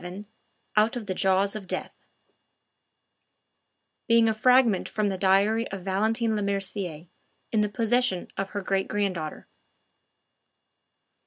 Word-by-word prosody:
VII 185 +4 -8 0.5
OUT 215 +3 +3
OF 240 -3 -5
THE 190 - -2
JAWS 195 +2 +1
OF 205 -3 -7
DEATH - - -3 2.2
Being 230 -1 +5
a 220 - +2
fragment 240 -2 +3
from 210 -1 0
the 190 - -3
diary 200 +4 +3
of 195 -2 -7
Valentine 220 +4 0
Lemercier, 195 -5 -3 0.4
in 220 - +2
the 210 - +1
possession 230 -3 +1
of 195 0 -3
her 205 0 -4
great 195 0 -1
granddaughter. 185 -7 -3
200 Hz, 120 wpm, -26 LUFS, 190-220 Hz, 2.2 s, Being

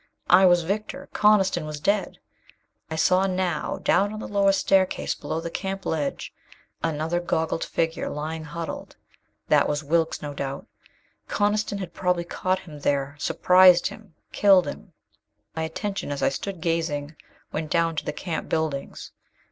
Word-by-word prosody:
I 190 0 +8
was 175 -1 +4
victor. 205 +5 -4
Coniston 195 -5 +3
was 150 -1 -6
dead. 200 +5 0 0.7
I 160 - -3
saw 185 +4 +3
now, 185 -4 -1
down 200 +1 +3
on 215 - -6
the - - -6
lower 200 -1 +3
staircase 190 -1 +2
below 160 - -4
the 165 0 -5
camp 195 +1 -4
ledge, 150 -3 -2 0.5
another 160 +2 -1
goggled 160 -2 -1
figure 165 0 -1
lying 155 +2 -4
huddled. 165 +1 -6 0.5
That - - +4
was 145 +1 -1
Wilks, 165 +2 +1
no 145 -1 -6
doubt. 140 0 -5 0.6
Coniston 205 0 0
had 185 -3 -6
probably 180 -2 0
caught 185 +2 -1
him 150 -4 -11
there, 140 0 0
surprised 180 +2 +5
him, 205 -7 -6 0.2
killed 195 -3 +5
him. 200 - -8 0.6
My 160 - -2
attention, 175 +1 -3
as 140 - -3
I - - +4
stood 180 +6 -5
gazing, 160 -3 -1 0.4
went 155 0 -3
down 165 0 +1
to - - -1
the - - -3
camp 170 -4 -5
buildings. 155 -4 -3
170 Hz, 155 wpm, -25 LUFS, 155-190 Hz, 0.7 s, I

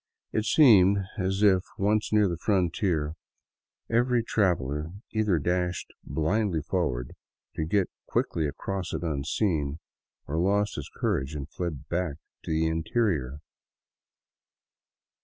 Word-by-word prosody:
It 110 - 0
seemed 100 - +6 0.2
as 95 +2 0
if, 95 -3 +5 0.2
once 105 +2 +1
near 105 -1 +4
the 85 - -1
frontier, 85 -5 +1 0.7
every 120 +1 +2
traveler 80 - 0 0.2
either 105 -5 +2
dashed 90 +3 -1
blindly 80 +3 0
forward 70 -8 -1 0.4
to 80 - -1
get 95 +3 +2 0.2
quickly 80 -2 0
across 90 +5 -4
it 80 +1 -3
unseen, 75 0 -1 0.5
or 80 +3 -2
lost 100 +3 +2
his - - -6
courage 65 +3 -1
and 70 -1 -5
fled 80 -3 -5
back 85 -4 -1 0.3
into - - -9
the 80 +1 +2
interior. 80 - 0
90 Hz, 120 wpm, -27 LUFS, 75-100 Hz, 0.7 s, seemed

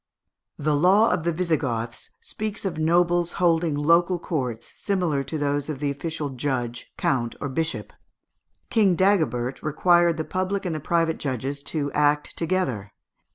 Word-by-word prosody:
The 150 0 +1
law 190 +9 +5
of 160 - -1
the 170 - +2
Visigoths 145 -9 -2
speaks 215 -1 -5
of 170 -5 -2
nobles 175 +1 +2
holding 165 -3 +2
local 170 +5 +3
courts, 130 - -3
similar 175 -8 -1
to 155 - -4
those 145 0 -1
of 150 - -3
the 140 +1 -1
official 150 0 -4
judge, 125 -3 -3
count, 120 -3 0
or - - -3
bishop. 160 +5 -2 0.8
King 205 -6 +4
Dagobert 155 - +1
required 170 +2 +3
the 160 - -1
public 185 +3 -2
and 175 - -1
the 155 - -3
private 165 +1 0
judges 135 +1 -3
to 145 -3 -2
act 150 0 +1
together. 135 - -1
155 Hz, 150 wpm, -24 LUFS, 140-175 Hz, 0.8 s, law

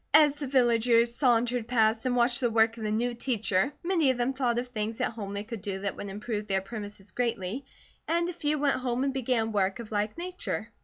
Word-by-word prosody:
As 295 -2 +6
the 285 - -3
villagers 235 -2 +3
sauntered 240 -2 +2
past 225 0 +2
and 250 - +1
watched 240 +1 +3
the 245 -3 +1
work 225 0 +3
of 230 - -10
the 215 - -1
new 235 +3 0
teacher, 225 -3 0
many 340 -5 +2
of 260 - +1
them 245 +2 0
thought 250 -3 0
of 245 +1 -2
things 220 -1 -3
at - - 0
home 210 -4 -6
they 200 0 -3
could 225 -1 -7
do 190 -1 -4
that 200 -1 -2
would 205 - -6
improve 210 +1 -4
their 195 -1 +2
premises 205 -1 -7
greatly, 235 0 -2 0.4
and 340 +1 +1
a 355 - -3
few 305 -2 0
went 285 -1 +2
home 250 0 -1
and 275 -1 0
began 245 -4 0
work 195 -2 +1
of 230 -2 -9
like 210 +3 -1
nature. 365 +1 -4
235 Hz, 225 wpm, -28 LUFS, 215-260 Hz, 0.4 s, As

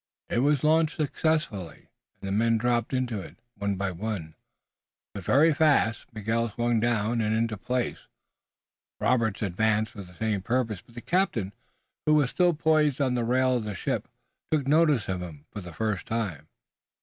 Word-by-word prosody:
It - - +2
was 145 +1 +2
launched 160 +1 +3
successfully 150 - -1 0.3
and 100 - -7
the - - -2
men 115 +3 +3
dropped 120 0 0
into 125 -6 -1
it, 85 - -11 0.2
one 100 -2 -2
by 100 0 -2
one, 90 -4 -4 0.8
but - - -7
very 155 +4 +4
fast. 145 -7 +2
Miguel 115 +1 -1
swung 120 +2 0
down 115 0 +1
and 110 0 +1
into 115 0 0
a - - -5
place. 125 +2 -2 0.9
Robert 115 -5 +1
advanced 110 +3 +1
for 100 - -9
the 90 -2 -13
same 110 -2 -1
purpose, 110 -2 -1
but 120 - -22
the 120 - -7
captain, 120 - 0 0.5
who 155 - +5
was 145 -4 +3
still 175 -2 +3
poised 155 -3 +2
on 130 -3 +2
the 120 -1 0
rail 130 +2 +2
of 115 - -3
the 105 -2 -4
ship, - - -2 0.4
took 145 -4 +1
notice 150 -6 +3
of 95 -1 -2
him 80 -4 -9
for 105 - -6
the 90 -1 -9
first 105 +1 -2
time. 100 -10 -3
115 Hz, 175 wpm, -27 LUFS, 100-135 Hz, 0.9 s, who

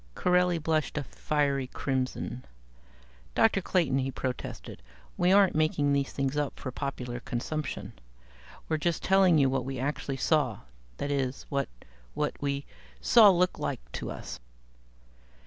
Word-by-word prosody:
Corelli 180 -1 +3
blushed 155 -2 -1
a 150 - 0
fiery 140 0 -1
crimson. 130 -1 -3 0.9
"Dr. 215 -3 +4
Clayton," 165 -8 +1
he 135 0 -1
protested, 130 - -5 0.3
"we 180 +1 +3
aren't 195 -1 +6
making 155 -2 +2
these 140 -1 0
things 135 0 -1
up 145 -2 -2
for 130 - -5
popular 125 -3 -4
consumption. 140 +5 -4 0.7
We're 155 - 0
just 165 +2 -1
telling 190 -3 +5
you 140 -2 +5
what 130 -1 0
we 135 +1 -4
actually 135 +1 -2
saw 135 -6 +1 0.4
that 145 - -2
is 135 -1 -1
what 140 -1 -1 0.5
what - - 0
we 140 0 -2 0.3
saw 220 - +7
looked 180 -1 +2
like - - -4
to - - -5
us." - - -7
140 Hz, 140 wpm, -29 LUFS, 130-160 Hz, 0.9 s, saw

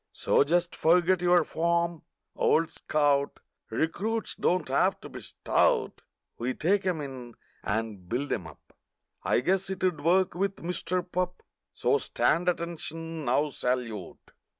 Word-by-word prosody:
So - - +3
just 175 +4 +1
forget 175 +2 +3
your 175 0 +5
form, 170 0 0 0.3
old 165 0 +2
scout; 145 -2 +1 0.3
Recruits 195 - -1
don't 180 +1 0
have - - +2
to - - -9
be - - -9
stout; - - +1 0.4
We 125 +2 -2
take 190 +4 +1
'em 170 -4 0
in 130 -4 -8 0.3
and 105 -4 -3
build 135 +5 -1
'em 85 - -3
up— 80 - -16 0.5
I - - +2
guess 190 +7 +1
'twould 185 -5 -1
work 185 +3 +3
with 195 +1 -2
Mister 180 +1 -1
Pup— 180 0 -3 0.3
So - - +1
stand 165 +9 +1
ATTENTION, 165 -2 -4
now—Salute! 125 - -2
165 Hz, 130 wpm, -28 LUFS, 135-180 Hz, 0.5 s, your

